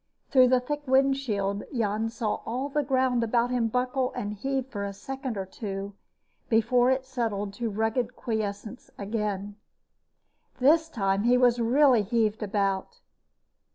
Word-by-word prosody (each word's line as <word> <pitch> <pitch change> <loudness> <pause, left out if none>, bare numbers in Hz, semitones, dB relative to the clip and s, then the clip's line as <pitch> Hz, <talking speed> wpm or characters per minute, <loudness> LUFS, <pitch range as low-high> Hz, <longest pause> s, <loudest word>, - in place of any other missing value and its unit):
Through 255 -3 +6
the 255 0 +4
thick 295 +4 -4
windshield 260 -7 +1
Jan 220 -3 -1
saw 225 -2 -3
all 255 +5 -3
the 295 +1 0
ground 260 -3 +1
about 235 +2 +1
him 245 -2 +1
buckle 250 +2 0
and 205 0 -3
heave 265 +5 -2
for 210 -6 -5
a 200 0 -4
second 265 +2 -5
or 190 - -3
two 195 0 -6 0.6
before 245 +2 +3
it 260 0 +1
settled 220 -6 -3
to 235 -1 -1
rugged 225 +3 -1
quiescence 215 +1 -4
again. 205 -1 -3 1.0
This 320 +5 +4
time 195 -6 0
he 245 +1 +5
was 245 -1 +4
really 255 0 +4
heaved 220 0 0
about. 200 - -1
235 Hz, 145 wpm, -27 LUFS, 205-260 Hz, 1.0 s, Through